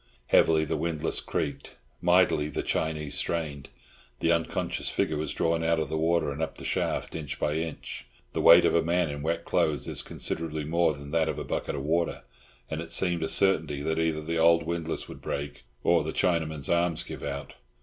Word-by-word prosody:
Heavily 80 -1 +5
the - - -1
windlass 80 -2 -1
creaked. - - -4 0.3
Mightily 90 -4 +3
the - - -3
Chinee 75 -2 -1
strained. 75 -3 -2 0.5
The 85 - +2
unconscious 85 -1 -1
figure 80 - 0
was 75 +1 -2
drawn 85 0 0
out 80 0 +2
of 80 -3 -2
the 80 - -1
water 85 -2 +2
and 70 +3 -5
up 80 - -3
the - - -9
shaft, - - -1
inch 75 -3 -5
by 75 - 0
inch. 80 -5 -5 0.3
The - - -1
weight 85 +1 +8
of - - +3
a 85 - +4
man 85 -1 +1
in 70 0 -5
wet 85 +2 -2
clothes 75 -4 +1
is - - 0
considerably 80 -2 -2
more 80 0 +2
than 70 0 -10
that 80 -1 +2
of - - -3
a - - -3
bucket - - -3
of 70 - -4
water, 85 +3 0 0.4
and 80 0 -4
it 85 0 -8
seemed 85 -1 +1
a 80 - -1
certainty 80 -7 +2
that 80 +1 0
either 80 -1 0
the 80 +1 -2
old 85 0 +5
windlass 80 0 -3
would - - -10
break 70 0 -5 0.2
or 85 -2 +4
the 80 - -4
Chinaman's 80 -5 0
arms 85 -1 +1
give - - -8
out. 70 0 -5
80 Hz, 200 wpm, -28 LUFS, 75-85 Hz, 0.5 s, weight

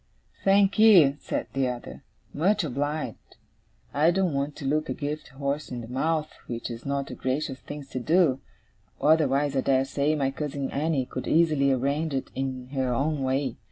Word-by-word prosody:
'Thank'ee,' 195 -6 +6
said - - -3
the 135 -1 +1
other. 120 - -6 0.3
'Much 190 +6 +2
obliged. 145 +2 -4 0.6
I 150 +3 +4
don't 180 -2 +1
want 140 +1 -2
to 140 - -8
look 155 +3 0
a - - -2
gift 150 +1 -4
horse 140 +2 -3
in 125 -2 -5
the 115 - -8
mouth, 155 +5 -1 0.2
which 120 0 -4
is 115 +3 -8
not 140 0 -2
a - - -6
gracious 135 +1 -2
thing 145 0 -8
to 130 - -3
do; 155 0 +3 0.6
otherwise, 145 -2 +3
I 135 - +2
dare 135 0 +2
say, 145 +3 0
my 135 -2 0
cousin 140 -1 -4
Annie 145 -2 0
could 130 - -6
easily 155 -4 +3
arrange 140 +4 0
it 135 - -3
in 130 -1 -4
her 130 -2 -1
own 140 +4 0
way. 130 -1 -1
140 Hz, 175 wpm, -26 LUFS, 130-155 Hz, 0.6 s, Thank'ee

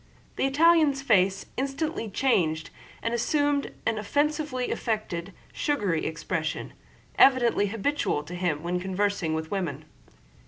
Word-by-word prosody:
The - - +1
Italian's 300 -1 +4
face 195 -5 +3
instantly 275 -2 -2
changed 170 -9 +1 0.3
and 230 - -1
assumed 290 +4 +1
an 220 - 0
offensively 290 +3 -1
affected, 205 -6 -3 0.2
sugary 205 - 0
expression, 160 0 -3 0.5
evidently 240 -6 +5
habitual 225 - -1
to 170 - -9
him 175 -4 -1
when 175 +1 -1
conversing 190 -3 -1
with 160 0 -4
women. 160 -7 -3
210 Hz, 115 wpm, -27 LUFS, 175-275 Hz, 0.5 s, evidently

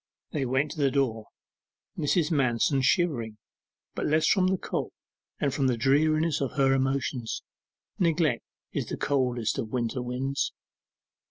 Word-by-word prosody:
They 140 -4 -1
went 135 +4 +1
to 155 - -7
the 140 - +4
door, 125 -6 0 0.7
Mrs. 160 +2 +1
Manston 135 -1 +2
shivering; 130 - +1 0.6
but - - -2
less 155 +1 +3
from 185 -3 +4
the 190 0 +2
cold, - - -3 0.5
than 140 - +1
from 135 0 +1
the 125 -2 +1
dreariness 155 +5 +2
of 135 - -1
her 135 -3 +3
emotions. 135 -3 -1 0.6
Neglect 165 -7 +2 0.3
is - - -2
the - - -4
coldest 125 -4 0
of 115 -4 -3
winter 120 +1 -1
winds. 130 +3 -2
135 Hz, 145 wpm, -27 LUFS, 125-155 Hz, 0.7 s, the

